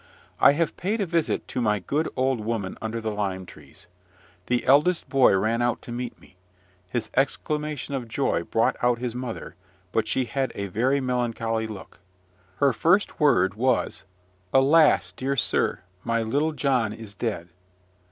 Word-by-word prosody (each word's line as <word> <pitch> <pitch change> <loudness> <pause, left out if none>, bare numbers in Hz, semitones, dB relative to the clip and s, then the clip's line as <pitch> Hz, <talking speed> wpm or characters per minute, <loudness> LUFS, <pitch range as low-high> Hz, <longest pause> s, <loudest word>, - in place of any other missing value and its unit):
I - - +7
have 165 +1 -1
paid 210 +5 -1
a 200 - +1
visit 170 -2 -1
to 125 - -2
my 105 -2 +2
good 145 - -1
old 130 -1 +1
woman 105 -3 -3
under 110 +1 -3
the 110 -1 -3
lime 95 -3 -3
trees. - - -14 0.6
The 125 0 0
eldest 150 +6 +4
boy 135 -7 +5
ran 115 +4 0
out 120 -1 +1
to - - -9
meet 120 +1 -5
me: 90 - -21 0.5
his 115 0 -3
exclamation 150 +1 -1
of 130 -3 -3
joy 115 - 0
brought - - +1
out 120 -1 +3
his 120 -1 -3
mother, 125 -2 -6 0.4
but 110 +2 0
she 130 - 0
had 135 0 -2
a 100 -1 -4
very 125 +8 +1
melancholy 115 -3 -1
look. 105 -4 -10 0.6
Her 140 +4 +3
first 170 - +2
word 95 - +4
was, 125 +3 0 0.5
"Alas! 145 +4 +5
dear 135 +1 -2
sir, 125 - 0 0.2
my 115 0 0
little 145 +8 0
John 130 -6 +1
is 110 -2 -10
dead." 100 -5 -4
125 Hz, 160 wpm, -25 LUFS, 110-140 Hz, 0.6 s, I